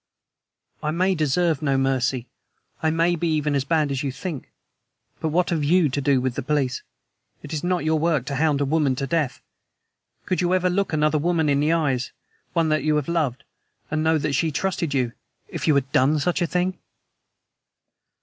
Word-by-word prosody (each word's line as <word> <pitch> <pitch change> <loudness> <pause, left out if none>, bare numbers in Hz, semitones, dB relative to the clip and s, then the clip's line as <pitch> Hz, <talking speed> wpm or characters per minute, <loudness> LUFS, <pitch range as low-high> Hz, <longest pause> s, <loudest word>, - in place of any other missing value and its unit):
"I 150 - -1
may 185 +4 +1
deserve 160 0 +1
no 140 -3 +1
mercy; 130 -2 0 0.5
I 160 - +2
may 165 +2 +2
be 170 +1 -1
even 150 -1 0
as 140 -2 +1
bad 155 -1 +1
as 135 -1 -1
you 140 - -2
think; 150 +1 -6 0.7
but - - -1
what 175 +4 +1
have 160 -3 0
YOU 165 +1 +3
to 140 +2 -2
do 135 -1 +3
with 130 0 -1
the 140 - -3
police? 135 -2 -1 0.6
It 150 - -7
is 155 - -3
not 180 -2 0
your 155 0 +2
work 155 -5 +1
to 140 0 -3
hound 150 -1 +2
a - - +2
woman 145 -2 +1
to 135 - -2
death. 150 -2 -1 0.8
Could 185 - 0
you 180 +1 +2
ever 180 0 +1
look 200 +2 0
another 155 0 +2
woman 165 -1 +1
in 140 -1 +2
the 150 +2 +2
eyes 140 -7 0 0.4
one 165 -2 +2
that 155 0 +1
you 155 0 +2
loved, 145 -4 -1 0.5
and 155 0 0
know 160 0 +3
that 150 -1 -1
she 160 +3 +1
trusted 170 -2 -1
you 125 -3 +1 0.4
if - - -4
you 155 - +4
had 135 -1 0
done 140 +4 +3
such 175 +5 0
a 175 - +2
thing? 180 +2 -1
155 Hz, 200 wpm, -23 LUFS, 140-170 Hz, 0.8 s, you